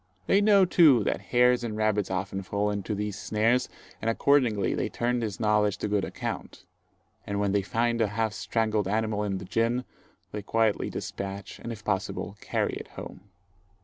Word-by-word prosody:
They 195 Hz, -, +4 dB
know 200 Hz, -2 st, +6 dB
too 155 Hz, -, +6 dB
that -, -, -1 dB
hares 125 Hz, 0 st, +4 dB
and 110 Hz, -2 st, -3 dB
rabbits 110 Hz, -2 st, +1 dB
often 95 Hz, +1 st, -2 dB
fall 100 Hz, +2 st, -1 dB
into 105 Hz, +1 st, -3 dB
these 105 Hz, 0 st, -3 dB
snares, 115 Hz, +4 st, +1 dB, 0.3 s
and 115 Hz, -, 0 dB
accordingly 120 Hz, -4 st, +2 dB
they -, -, -1 dB
turn 120 Hz, +1 st, 0 dB
this 110 Hz, -4 st, -3 dB
knowledge 105 Hz, -2 st, +2 dB
to -, -, -2 dB
good 105 Hz, -1 st, +1 dB
account; -, -, -5 dB, 0.6 s
and 100 Hz, 0 st, -2 dB
when 100 Hz, -1 st, +1 dB
they 100 Hz, 0 st, +2 dB
find 115 Hz, +4 st, 0 dB
a 110 Hz, -, +3 dB
half 110 Hz, +1 st, -1 dB
strangled 105 Hz, +2 st, 0 dB
animal 105 Hz, 0 st, 0 dB
in 100 Hz, -2 st, -1 dB
the 95 Hz, -, -7 dB
gin, 115 Hz, +6 st, 0 dB, 0.5 s
they 105 Hz, -, -4 dB
quietly 110 Hz, +1 st, +1 dB
despatch, 100 Hz, 0 st, -6 dB
and 120 Hz, -, -6 dB
if 110 Hz, -2 st, -9 dB
possible 95 Hz, -1 st, -2 dB
carry -, -, -1 dB
it -, -, -6 dB
home. 100 Hz, +2 st, -9 dB
105 Hz, 180 wpm, -27 LUFS, 100-115 Hz, 0.6 s, know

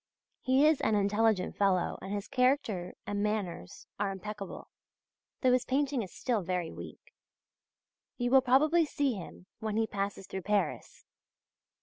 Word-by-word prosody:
He 265 Hz, +2 st, +4 dB
is 310 Hz, -2 st, +4 dB
an 220 Hz, -, +2 dB
intelligent 205 Hz, -1 st, +2 dB
fellow 190 Hz, -3 st, +1 dB
and 190 Hz, -, -6 dB
his 205 Hz, 0 st, -3 dB
character 250 Hz, -9 st, +1 dB
and 205 Hz, 0 st, -2 dB
manners 205 Hz, -, -3 dB
are 205 Hz, -1 st, +1 dB
impeccable, 200 Hz, +1 st, -7 dB, 0.7 s
though 255 Hz, -2 st, +4 dB
his 250 Hz, 0 st, +3 dB
painting 275 Hz, -1 st, 0 dB
is 190 Hz, -5 st, -7 dB
still 235 Hz, -5 st, -1 dB
very 180 Hz, -2 st, -2 dB
weak. -, -, -11 dB, 1.0 s
You 245 Hz, -1 st, -1 dB
will 265 Hz, 0 st, +7 dB
probably 300 Hz, +7 st, +4 dB
see 285 Hz, -3 st, 0 dB
him 180 Hz, -2 st, -9 dB
when 215 Hz, -1 st, -2 dB
he 225 Hz, -, +3 dB
passes 200 Hz, -2 st, -3 dB
through 190 Hz, +1 st, -5 dB
Paris. 205 Hz, +2 st, -2 dB
210 Hz, 145 wpm, -31 LUFS, 195-255 Hz, 1.0 s, will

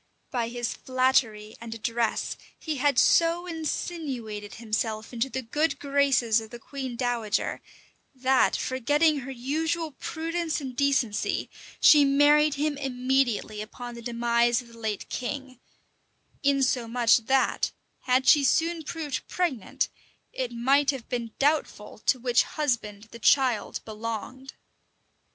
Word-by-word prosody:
By 240 Hz, -3 st, -1 dB
his 240 Hz, 0 st, -3 dB
flattery 245 Hz, -5 st, 0 dB
and 230 Hz, -1 st, -6 dB
address, 230 Hz, 0 st, -1 dB, 0.2 s
he 310 Hz, -3 st, -4 dB
had 280 Hz, -1 st, +2 dB
so 335 Hz, +6 st, +4 dB
insinuated 285 Hz, -, -4 dB
himself 220 Hz, 0 st, -3 dB
into 240 Hz, +3 st, -1 dB
the 260 Hz, 0 st, -4 dB
good 300 Hz, +7 st, 0 dB
graces 275 Hz, -5 st, +2 dB
of 220 Hz, -, -10 dB
the 240 Hz, -, -9 dB
queen 260 Hz, +1 st, -6 dB
dowager, 235 Hz, -4 st, -1 dB, 0.5 s
that, 260 Hz, 0 st, +3 dB
forgetting 290 Hz, +4 st, +1 dB
her 265 Hz, 0 st, -8 dB
usual 310 Hz, +6 st, -2 dB
prudence 330 Hz, +2 st, -3 dB
and 265 Hz, -4 st, -6 dB
decency, 265 Hz, -6 st, 0 dB, 0.3 s
she 295 Hz, -2 st, +7 dB
married 290 Hz, +2 st, +4 dB
him 290 Hz, 0 st, -1 dB
immediately 250 Hz, -5 st, 0 dB
upon 240 Hz, +3 st, -8 dB
the 235 Hz, -, -9 dB
demise 235 Hz, 0 st, +1 dB
of 245 Hz, -2 st, -11 dB
the 230 Hz, 0 st, -15 dB
late 215 Hz, -3 st, -3 dB
king; 260 Hz, 0 st, -5 dB, 0.8 s
insomuch 250 Hz, -4 st, +3 dB
that, 265 Hz, 0 st, +2 dB, 0.4 s
had 255 Hz, +1 st, +2 dB
she 290 Hz, -, +7 dB
soon 330 Hz, +4 st, +2 dB
proved 305 Hz, -3 st, -5 dB
pregnant, 315 Hz, -, -1 dB, 0.5 s
it 255 Hz, -2 st, -3 dB
might 270 Hz, +4 st, +2 dB
have 270 Hz, -4 st, -2 dB
been 235 Hz, -3 st, -3 dB
doubtful 285 Hz, -8 st, 0 dB
to -, -, +4 dB
which 245 Hz, -1 st, +3 dB
husband 235 Hz, -9 st, -2 dB
the 235 Hz, -, -10 dB
child 255 Hz, -2 st, +2 dB
belonged. 230 Hz, +4 st, -6 dB
255 Hz, 130 wpm, -27 LUFS, 235-285 Hz, 0.8 s, she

